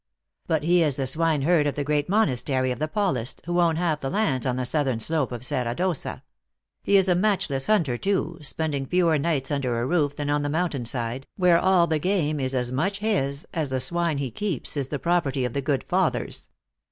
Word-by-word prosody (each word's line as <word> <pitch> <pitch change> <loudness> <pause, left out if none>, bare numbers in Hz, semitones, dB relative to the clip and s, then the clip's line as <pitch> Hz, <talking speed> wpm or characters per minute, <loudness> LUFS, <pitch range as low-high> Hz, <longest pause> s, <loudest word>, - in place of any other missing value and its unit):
" - - -47
But 160 -2 0
he 175 +2 +4
is 150 -5 +2
the 135 - -2
swine 155 +1 +1
herd 160 -1 +3
of 145 - -2
the 145 - -1
great 150 +2 0
monastery 130 - +1
of 125 - -4
the 155 - 0
Paulists, 155 - -1
who 175 +1 +1
own 165 -2 +3
half 160 -2 0
the 135 - -3
lands 135 - 0
on 125 - 0
the 130 0 -2
southern 135 -3 0
slope 150 +2 -1
of 120 0 -5
Serra 125 -3 -2
d 180 - -1
Ossa. 180 -6 -3 0.6
He 200 - +3
is 190 -1 +3
a 180 - +4
matchless 175 -8 0
hunter 160 - +2
too, 190 -4 -1
spending 145 -2 -2
fewer 170 -3 +2
nights 140 -3 -1
under 130 -5 -1
a 120 - -1
roof 145 -2 +1
than 145 -1 -2
on 145 0 +1
the 145 - -2
moun 170 +4 0
tain 130 -4 -4
side, 120 +2 -3
where 180 -3 +4
all 185 -2 +4
the 160 -2 0
game 155 -4 0
is 130 0 0
as 125 -1 -1
much 185 +10 -1
his, 155 -10 0
as 160 -6 -1
the 130 0 -1
swine 170 +1 +1
he 135 -3 -3
keeps 180 - -2
is 140 -3 -1
the 145 - -3
property 140 -5 0
of 125 - -3
the 140 - -1
good 135 0 -1
fathers. - - -1
150 Hz, 230 wpm, -25 LUFS, 135-175 Hz, 0.6 s, he